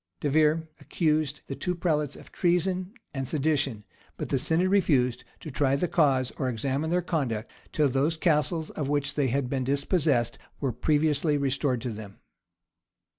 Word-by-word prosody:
De 145 - -1
Vere 155 +2 +3
accused; 155 -3 0
the - - -5
two 180 +6 -2
prelates 150 -5 0
of - - -14
treason 180 +1 0 0.2
and 135 -2 -3
sedition; 140 -7 0 0.3
but - - -4
the 135 - +1
synod 165 +7 +2
refused, 135 -11 +2 0.2
to 155 - -8
try 135 0 +2
the 160 +6 0
cause, 135 -7 +2
or 130 -3 0
examine 135 +6 -1
their 180 +1 +1
conduct, 130 -11 -2 0.2
till 150 -2 +2
those 140 +5 +1
castles 160 0 +1
of 140 -3 -3
which 145 -1 0
they 145 -3 +1
had 130 +1 0
been 130 0 -1
dispossessed, 140 - +1 0.2
were 135 -3 0
previously 150 +2 +2
restored 135 -2 0
to 125 - -3
them. 105 -2 -9
145 Hz, 165 wpm, -27 LUFS, 130-160 Hz, 0.3 s, Vere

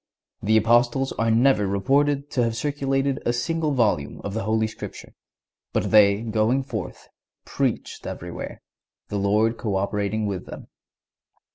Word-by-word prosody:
The 110 +2 +3
Apostles 120 +4 +3
are 115 0 +2
never 115 -2 +3
reported 140 +8 +1
to 125 - +1
have 115 -1 -1
circulated 135 0 -1
a - - +1
single 155 +6 -1
volume 105 - 0
of 100 - -4
the 110 -2 -3
Holy 110 +1 +1
Scripture, 110 - -8 0.6
but - - 0
"they 105 0 +5
going 115 +4 +1
forth, 110 -8 -6 0.4
preached - - -2
everywhere, - - -7 0.5
the 105 - -2
Lord 105 +3 +2
co 105 -4 -2
operating 105 +2 -1
with 95 -3 -4
them." - - -10
115 Hz, 140 wpm, -24 LUFS, 105-135 Hz, 0.6 s, they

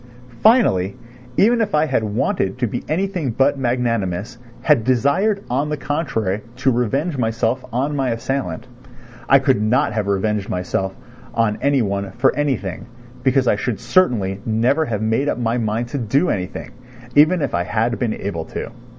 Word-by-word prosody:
Finally, 145 - +4 0.4
even 235 +3 +4
if 205 -6 0
I 150 +1 +3
had 130 -6 0
wanted 110 - -1
to 125 - 0
be 120 +2 -4
anything 180 -2 -1
but 135 +4 +1
magnanimous, 115 -4 -1 0.2
had 115 - +4
desired 140 - +2
on 140 +5 -1
the 150 - -2
contrary 125 - -2
to 130 +1 +2
revenge 135 +6 0
myself 115 +2 0
on 135 +5 -1
my 135 -2 0
assailant, 130 +4 -3 0.6
I 135 - +8
could 135 -5 +2
not 115 +3 +2
have 105 -2 -1
revenged 100 +1 0
myself 95 +1 -2 0.4
on 115 -2 +1
any 140 -3 +2
one 100 -1 -3
for 125 +3 +2
anything 135 -11 -2 0.3
because 130 0 +2
I 105 - +3
should 115 0 -2
certainly 105 - +1
never 120 +7 +1
have 110 -5 -2
made 115 +6 +1
up - - -1
my 120 0 0
mind 115 +2 -1
to 140 - -3
do 135 - +1
anything, 90 -2 -4 0.4
even 155 +3 +5
if 140 - -2
I 85 - +1
had 115 +4 0
been 115 -4 0
able 85 -5 -4
to. - - -6
120 Hz, 170 wpm, -20 LUFS, 110-140 Hz, 0.6 s, I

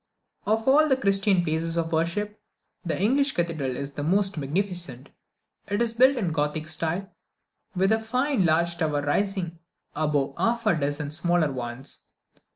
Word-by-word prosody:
Of 220 +2 +1
all 305 +3 +5
the 265 - +3
Christian 195 -4 +3
places 165 +1 -1
of 165 -1 -1
worship, 205 +6 -1 0.4
the 175 -2 -2
English 270 +7 +2
Cathedral 155 -7 -1
is 140 +2 -5
the 145 - -5
most 195 +5 +2
magnificent. 165 -3 -3 0.6
It 205 +1 -1
is 235 -1 +1
built 260 +3 +5
in 195 -8 0
the - - -4
Gothic 155 +1 -1
style, 170 +4 -2 0.6
with 190 +3 +2
a 220 - +3
fine 250 +1 0
large 170 +1 +2
tower 150 -3 0
rising 175 +2 -1 0.4
above 145 -2 0
half 235 0 0
a 210 - +4
dozen 145 -1 -2
smaller 170 -1 +1
ones. 125 +1 -5
170 Hz, 160 wpm, -26 LUFS, 155-205 Hz, 0.6 s, all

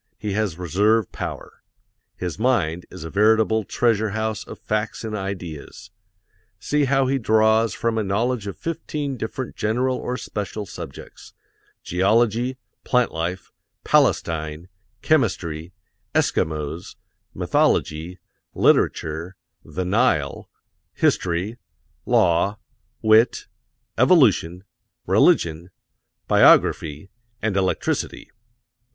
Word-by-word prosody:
He 105 -2 -4
has 105 -5 -1
reserve 100 +5 +1
power. - - -7 0.5
His 90 +1 -5
mind 95 -9 0
is - - -9
a 80 - -7
veritable 110 +1 +3
treasure 110 -1 +1
house 110 -1 -2
of - - -10
facts 110 +1 -3
and 110 -1 -4
ideas. 90 -6 -7 0.7
See 145 +7 +1
how 135 0 +2
he 135 +1 0
draws 110 -1 +3
from 115 -1 -1
a - - 0
knowledge 105 +3 -1
of 100 - -6
fifteen 150 -4 -4
different 120 +2 -5
general 125 +4 0
or 125 - -3
special 105 -1 -5
subjects: - - -10 0.5
geology, 115 +7 +1 0.3
plant 125 -1 +2
life, 85 +3 -4 0.3
Palestine, 80 +1 +1 0.3
chemistry, 90 - 0 0.4
Eskimos, 80 +1 -1 0.4
mythology, 80 +4 0 0.4
literature, 80 +4 +1 0.3
The 90 +1 -4
Nile, 90 - +1 0.4
history, 90 +7 0 0.5
law, 90 +4 +3 0.5
wit, 110 +2 +4 0.5
evolution, 110 - +4 0.4
religion, 85 +2 +2 0.6
biography, 75 +5 +4 0.3
and 110 -3 -1
electricity. 95 -1 -1
105 Hz, 95 wpm, -22 LUFS, 85-115 Hz, 0.7 s, wit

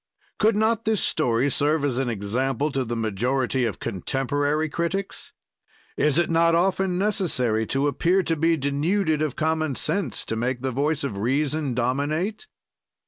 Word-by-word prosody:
Could 220 0 +3
not 220 +1 +1
this 220 -2 +2
story 125 -3 +1
serve 145 +2 +1
as 130 -3 0
an 135 -2 0
example 125 +7 -1
to 135 -1 -1
the 120 -1 -4
majority 120 +4 0
of 110 - -3
contemporary 145 - -1
critics? 170 +5 -3 0.6
Is 150 0 +2
it 170 - +3
not 165 0 +3
often 185 +1 +1
necessary 150 - 0
to 135 +1 0
appear 175 +7 +2
to 165 - 0
be 165 +1 +2
denuded 155 +4 0
of 155 -4 -1
common 155 -2 0
sense, 190 - -2
to 110 - -3
make 120 +2 -2
the 130 - 0
voice 145 +4 0
of 105 -8 -3
reason 140 +3 0
dominate? 145 - -1
145 Hz, 155 wpm, -24 LUFS, 130-165 Hz, 0.6 s, Could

